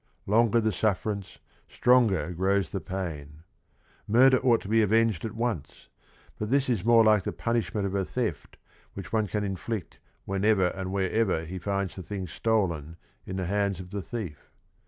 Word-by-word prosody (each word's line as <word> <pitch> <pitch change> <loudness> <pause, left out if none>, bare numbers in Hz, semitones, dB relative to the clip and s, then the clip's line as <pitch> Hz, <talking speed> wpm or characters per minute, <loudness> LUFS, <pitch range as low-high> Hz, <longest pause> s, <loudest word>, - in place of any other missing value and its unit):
" - - -44
Long 115 +3 +3
er - - +6
the 110 -1 +1
sufferance, 100 0 -2 0.3
stronger 110 -11 +3
grows 95 0 +1
t - - -2
he - - -17
pain," 80 -5 -6 0.6
Murder 130 +4 +6
ought 120 -3 +3
to - - -9
be 110 +2 +3
avenged 110 -3 +2
at 110 - -5
once, 115 - -4 0.5
but 105 - -3
this 140 +1 +2
is 115 -7 0
more 115 0 +6
like 110 -2 +5
the - - -3
punishment 115 -3 -1
of 95 - -3
a 100 -1 +1
theft 110 - -4 0.4
which 95 +1 -8
one 110 -2 +2
can 105 +3 -2
inflict 100 +1 -4 0.3
whenever 95 -1 +2
or 95 -1 -5
wherever 95 -2 0
he 90 +3 -6
finds 100 +1 -2
the 95 - -8
thing 95 +1 -5
stolen 85 -5 -1 0.3
in 95 - -4
the 95 -1 -2
hands 100 0 0
of 90 -1 -9
the 100 -1 -3
thief. 95 -8 -7
100 Hz, 180 wpm, -27 LUFS, 90-110 Hz, 0.6 s, er